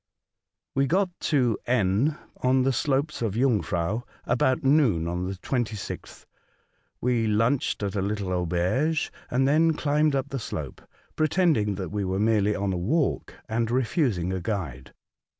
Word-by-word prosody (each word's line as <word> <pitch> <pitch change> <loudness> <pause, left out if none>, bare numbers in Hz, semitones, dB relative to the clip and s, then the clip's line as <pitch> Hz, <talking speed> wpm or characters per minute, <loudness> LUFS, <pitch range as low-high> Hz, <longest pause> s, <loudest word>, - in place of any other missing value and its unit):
WE 135 0 +2
got 185 +6 +2
to 125 -8 +1
N, 120 - +2 0.2
on 130 0 +2
the 135 +1 +2
slopes 140 +4 0
of 110 -4 -1
Jungfrau, 110 -5 +1 0.2
about 125 +2 +1
noon 135 - +3
on 90 +1 -2
the 95 - -4
26th. 110 0 -4 0.8
We 120 -2 +1
lunched 115 +2 +1
at 100 0 -2
a 100 - 0
little 100 -1 -2
auberge, 90 - 0 0.2
and 130 +2 +2
then 160 +3 +4
climbed 150 0 +2
up 135 +1 -1
the 135 - -3
slope, - - -6 0.3
pretending 155 - +2
that 95 -1 -4
we 105 -1 -1
were 95 0 -1
merely 105 -1 +2
on 100 -1 -1
a - - -2
walk, 135 - 0
and 115 0 -1
refusing 120 - 0
a 95 - -2
guide. 85 - -4
115 Hz, 150 wpm, -26 LUFS, 100-135 Hz, 0.8 s, then